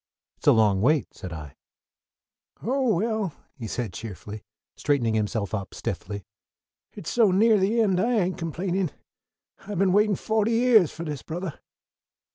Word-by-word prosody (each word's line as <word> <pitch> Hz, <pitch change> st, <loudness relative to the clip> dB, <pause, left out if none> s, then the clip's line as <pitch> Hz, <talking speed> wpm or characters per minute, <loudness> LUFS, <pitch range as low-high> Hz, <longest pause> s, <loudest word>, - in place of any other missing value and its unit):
"It's -, -, -11 dB
a -, -, +9 dB
long 105 Hz, -4 st, +4 dB
wait," 140 Hz, +1 st, +2 dB
said 90 Hz, -, -8 dB
I. 75 Hz, -4 st, -8 dB, 1.1 s
"Oh, 255 Hz, -2 st, +1 dB
well," 215 Hz, -2 st, -1 dB, 0.2 s
he 120 Hz, -5 st, -6 dB
said 110 Hz, -3 st, -3 dB
cheerfully, 105 Hz, +1 st, -8 dB, 0.3 s
straightening 130 Hz, -7 st, +1 dB
himself 110 Hz, -1 st, -1 dB
up 100 Hz, -3 st, -4 dB
stiffly, 100 Hz, -1 st, -5 dB, 0.7 s
"it's 165 Hz, -, -6 dB
so 230 Hz, -4 st, +4 dB
near 210 Hz, +3 st, +4 dB
the 205 Hz, +5 st, +2 dB
end 190 Hz, -5 st, +2 dB
I 235 Hz, +6 st, +2 dB
ain't 185 Hz, -2 st, 0 dB
complainin'. 175 Hz, +2 st, -1 dB, 0.7 s
I 205 Hz, +1 st, -7 dB
been 185 Hz, +1 st, +3 dB
waitin' 210 Hz, 0 st, +4 dB
fohty 220 Hz, +2 st, 0 dB
yeahs 230 Hz, -, +5 dB
for 170 Hz, -, -7 dB
this, 150 Hz, -4 st, -4 dB
Brother." 170 Hz, -1 st, -5 dB
170 Hz, 150 wpm, -26 LUFS, -, 1.1 s, a